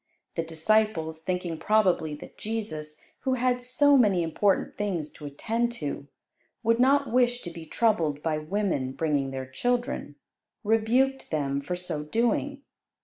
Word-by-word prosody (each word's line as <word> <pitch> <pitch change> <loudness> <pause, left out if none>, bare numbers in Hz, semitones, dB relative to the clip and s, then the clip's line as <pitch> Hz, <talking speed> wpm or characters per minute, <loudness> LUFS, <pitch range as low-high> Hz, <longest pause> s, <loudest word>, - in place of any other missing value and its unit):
The - - -1
disciples 165 0 +1
thinking 175 -2 -2
probably 185 -6 +2
that 145 - -12
Jesus, 180 -9 -4 0.2
who 260 -1 0
had 250 0 +1
so 275 +3 +4
many 195 -7 +4
important 190 +5 +1
things 180 -7 -2
to 150 - -9
attend 230 +11 -1
to, 145 -7 -4 0.6
would 230 +1 +3
not 275 +1 +4
wish 245 -1 +2
to 175 - -6
be 165 -1 -9
troubled 160 -11 +1
by 155 -2 0
women 155 -6 -1
bringing 145 -3 0
their 135 0 -4
children, 245 - -2 0.5
rebuked 235 +5 +2
them 140 -3 -1
for 160 +6 -3
so 175 -4 -4
doing. 240 - 0
190 Hz, 145 wpm, -27 LUFS, 155-235 Hz, 0.6 s, so